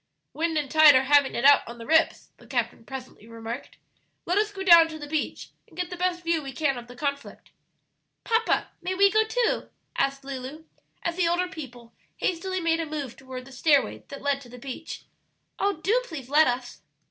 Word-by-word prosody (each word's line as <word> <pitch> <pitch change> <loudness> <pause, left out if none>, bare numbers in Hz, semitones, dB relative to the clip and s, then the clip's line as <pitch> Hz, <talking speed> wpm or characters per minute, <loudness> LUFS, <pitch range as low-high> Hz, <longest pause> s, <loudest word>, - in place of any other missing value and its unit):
"Wind 325 0 -1
and 290 -3 -2
tide 310 -3 +8
are 260 - +5
having 280 0 +4
it 240 - -1
out 285 0 +8
on 235 +1 -8
the 230 - -9
rips," 320 +3 +2
the - - -18
captain - - -2
presently 255 -4 -9
remarked. 230 +2 -8 0.5
"Let 360 +4 +2
us 425 0 0
go 390 -2 -6
down 340 -3 +8
to 315 -1 -8
the 295 - -7
beach 305 +1 -3 0.2
and - - -20
get 360 0 -3
the - - -4
best 360 0 -1
view 335 -1 +1
we 270 -2 -7
can 280 -1 0
of 240 -1 -8
the 245 - -12
conflict." 280 +1 -5 0.7
"Papa, 455 0 +1
may 365 +2 -2
we 395 +1 +5
go 435 +2 +4
too?" 455 +2 -1 0.3
asked 275 0 0
Lulu, 275 +3 -7 0.4
as 340 0 -2
the 355 -2 +2
older 350 +2 +1
people 250 -9 -10 0.2
hastily 375 +1 -2
made 330 -1 +1
a 325 - -2
move 290 -5 -5
toward 260 -1 -9
the 270 - -14
stairway 280 +2 +2
that 280 - -9
led 280 -1 0
to 245 - -14
the 250 - -11
beach; 270 +5 -7 0.6
"oh, 400 0 +2
do 400 +10 +1
please 275 -7 -8
let 305 +2 +5
us!" 245 0 -3
300 Hz, 205 wpm, -26 LUFS, 265-345 Hz, 0.7 s, tide